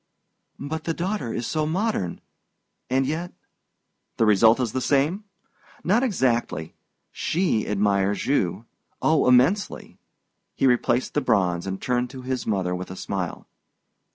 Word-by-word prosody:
"But 155 +3 -5
the 165 - -1
daughter 180 - -2
is 120 - -3
so 155 +3 -1
modern 170 - -1 0.7
and 130 +1 +2
yet 165 +5 -3 0.4
" - - -52
"The 115 - +3
result 110 +3 +5
is 120 -4 0
the 130 - -2
same? 150 - +1 0.6
Not 210 +7 +3
exactly. 120 - 0 0.4
She 165 - 0
admires 100 -1 +1
you 105 -6 0 0.3
oh, 155 -4 +3
immensely!" 130 +12 +2 0.6
He - - +1
replaced 125 0 +2
the 150 - +1
bronze 95 -7 +1
and 95 0 -3
turned 125 0 -1
to 130 0 -9
his 130 -1 -3
mother 95 -4 0
with 90 +1 -5
a 95 - -7
smile. 95 -3 -4
125 Hz, 140 wpm, -24 LUFS, 100-155 Hz, 0.7 s, result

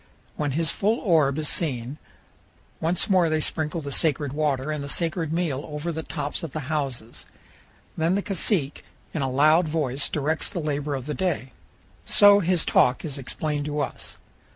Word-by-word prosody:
When 145 -3 -1
his 165 -2 +1
full 215 +3 +1
orb 155 -7 +3
is 155 -1 0
seen, 135 -3 -1 0.8
once 170 +5 0
more 185 -5 +4
they 155 0 +1
sprinkle 155 +1 -2
the 140 -1 -6
sacred 145 -2 0
water 145 -1 0
and 150 -2 -3
the 140 - -6
sacred 165 0 -1
meal 160 -5 -1
over 150 +3 -3
the 160 0 -4
tops 145 -2 -4
of 165 -5 -6
the 155 - -3
houses. 135 -7 -4 0.7
Then 165 +3 +1
the 200 - -1
cacique 180 -6 0 0.3
in 155 - -2
a 135 - 0
loud 155 +6 +4
voice 145 -3 -1
directs 155 +2 -1
the - - -7
labor 145 -2 -2
of 130 -2 -5
the 150 - -3
day. 165 -8 -2 0.5
So 205 0 +7
his 180 -2 +1
talk 125 +5 +3
is 145 -3 -5
explained 145 +2 -3
to 150 0 -2
us. 140 - -5
150 Hz, 175 wpm, -25 LUFS, 140-165 Hz, 0.8 s, So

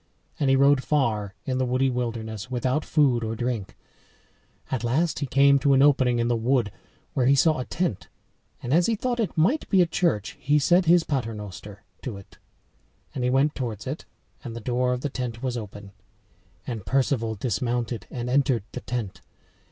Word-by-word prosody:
And 140 -3 +2
he 135 - +5
rode 140 0 +4
far 110 -9 0
in 130 -2 -1
the 130 - +1
woody 130 +2 +1
wilderness 115 -2 -4
without 130 +4 0
food 135 -7 +2
or 110 0 -3
drink. 120 -4 -3 0.9
At 130 -3 -1
last 150 +8 0
he 140 - -2
came 140 +1 +5
to 140 +1 +3
an 135 0 +5
opening 130 -4 +4
in 115 0 +1
the 120 - +2
wood 115 -2 +1 0.4
where 125 -2 +1
he 140 - +5
saw 155 +1 +3
a 125 - -3
tent, 105 - -2 0.6
and 125 - -1
as 170 +2 +4
he 230 - +1
thought 245 +2 -2
it 215 -6 -2
might 235 - +2
be 195 - +4
a 180 - +6
church 165 - -1
he 145 +2 +2
said 175 +5 +3
his 170 +1 +5
pater 125 -8 -2
noster 105 0 -9 0.2
to 115 -6 -5
it. 100 - -15 0.7
And 130 - -3
he 125 - +2
went 135 +4 +2
towards 115 -6 -5
it; 140 +5 -5 0.4
and 115 -3 -7
the - - -5
door 125 +2 0
of 125 0 -2
the 145 - -2
tent 125 -3 -5
was 125 -2 -1
open. 105 -3 -8 0.7
And 115 -5 -5
Perceval 125 -2 0
dismounted 120 +1 -2
and 120 -1 -5
entered 130 -3 +2
the 125 - -6
tent. 120 -6 -5
125 Hz, 190 wpm, -25 LUFS, 115-140 Hz, 0.9 s, a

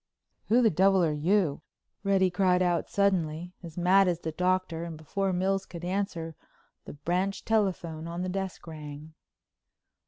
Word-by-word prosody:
"Who 240 +3 +4
the 225 - +5
devil 190 +2 +4
are 155 -2 +2
you?" 160 0 +1 0.4
Reddy 190 -2 +3
cried 185 0 +3
out 175 -2 0
suddenly, 180 -4 0
as 170 -2 -10
mad 185 +2 +5
as 175 -1 0
the 160 - -3
Doctor, 180 0 0
and 165 -2 -6
before 190 +5 -2
Mills 190 +2 0
could 175 -1 -8
answer, 175 -4 -2 0.5
the - - -8
branch 180 +7 -2
telephone 175 -7 0
on 170 +2 -4
the - - -2
desk 190 0 -4
rang. 155 -1 -9
180 Hz, 155 wpm, -28 LUFS, 165-195 Hz, 0.5 s, the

